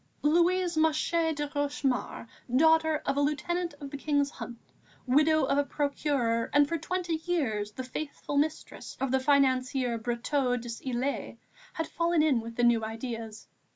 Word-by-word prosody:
Louise 345 +3 +3
Masché 320 +1 +2
de 295 0 -2
Rochemaure, 285 -4 -2 0.3
daughter 320 +1 +4
of 275 0 0
a - - +3
Lieutenant 320 +3 -1
of 280 -2 -8
the 285 - -5
King's 285 0 0
Hunt, 235 - -8 0.5
widow 305 +4 +4
of 275 +1 +2
a - - +3
Procureur 280 -5 -1
and, 290 0 +5
for 335 +2 -2
twenty 345 0 -2
years, 220 -12 -1
the 260 - -5
faithful 285 +2 -5
mistress 305 +2 -2
of 270 -2 -1
the 265 - +3
financier 260 -3 +2
Brotteaux 245 +2 0
des 235 -1 -7
Ilettes, 260 +2 -2 0.4
had 325 - -2
fallen 335 -2 +1
in 285 -6 +3
with 230 0 -8
the 240 - 0
new 235 -2 +4
ideas. 225 -1 -6
285 Hz, 155 wpm, -29 LUFS, 245-315 Hz, 0.5 s, and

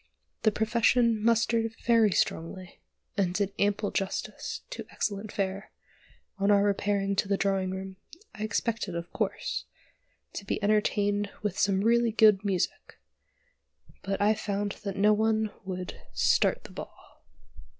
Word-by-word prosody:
The 215 - +4
profession 230 +1 +2
mustered 230 0 +2
very 230 -2 +5
strongly, 180 0 -2 0.4
and 185 -4 0
did 200 -1 0
ample 205 0 +1
justice 195 0 -3
to - - -5
excellent 205 0 -3
fare; 195 0 -3 0.7
on 200 +1 +2
our 200 -1 +5
repairing 200 -1 +1
to 200 - +1
the 200 0 +1
drawing 195 -1 0
room, 190 0 -6 0.4
I 215 - -10
expected, 215 -3 -1
of 170 0 -6
course, - - -2 0.7
to - - -5
be 195 - -2
entertained 205 -1 +1
with 205 -3 -2
some 195 -1 +2
really 235 +1 +3
good 215 -3 +5
music, 190 -4 -2 1.0
but 195 0 -2
I 210 +1 +4
found 205 -1 -2
that 200 -1 -4
no 210 +2 +5
one 220 0 +1
would 185 -1 -6
"start - - +2
the - - -11
ball." - - -11
205 Hz, 140 wpm, -28 LUFS, 195-215 Hz, 1.0 s, very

